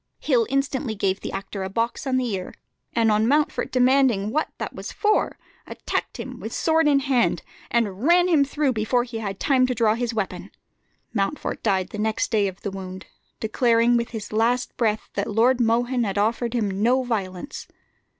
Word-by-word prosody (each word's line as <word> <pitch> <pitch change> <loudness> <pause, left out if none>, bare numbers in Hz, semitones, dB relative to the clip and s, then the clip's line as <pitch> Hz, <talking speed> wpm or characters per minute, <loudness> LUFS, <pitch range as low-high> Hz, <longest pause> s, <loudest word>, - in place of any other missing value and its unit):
Hill 245 -6 +2
instantly 275 -3 -1
gave 195 -1 0
the - - -5
actor 195 0 -5
a 190 - -3
box 230 +7 -2
on 260 -1 +1
the 255 -1 0
ear, 185 -1 -5 0.4
and 225 -1 +3
on 215 +1 +2
Mountfort 295 +3 +1
demanding 250 -5 +3
what 310 +5 0
that - - -5
was - - -7
for, 425 0 +1 0.3
attacked - - -4
him - - -7
sword 320 -1 +2
in 280 -2 +4
hand, 260 -3 +1 0.3
and 210 -4 0
ran 350 +5 +4
him 320 -6 +4
through 285 -1 0
before 235 +2 +1
he 235 -2 -6
had 195 -3 -4
time 255 -2 +3
to 250 - -1
draw 220 -2 +3
his 240 +1 -2
weapon. 215 -4 -4 0.6
Mountfort 210 +7 -2
died 190 -4 +1
the 210 - -7
next 220 +1 -1
day 210 -3 +2
of 190 0 -7
the 200 - -4
wound, 185 -1 -7 0.3
declaring 230 +1 +3
with 235 -1 0
his 215 -2 -7
last 235 +3 +1
breath 220 -2 0
that 200 - -2
Lord 240 +4 +3
Mohun 240 +2 +2
had 200 -2 -2
offered 230 +3 0
him 200 -4 -1
no 255 +4 +3
violence. 200 -2 -4
230 Hz, 185 wpm, -24 LUFS, 210-255 Hz, 0.6 s, in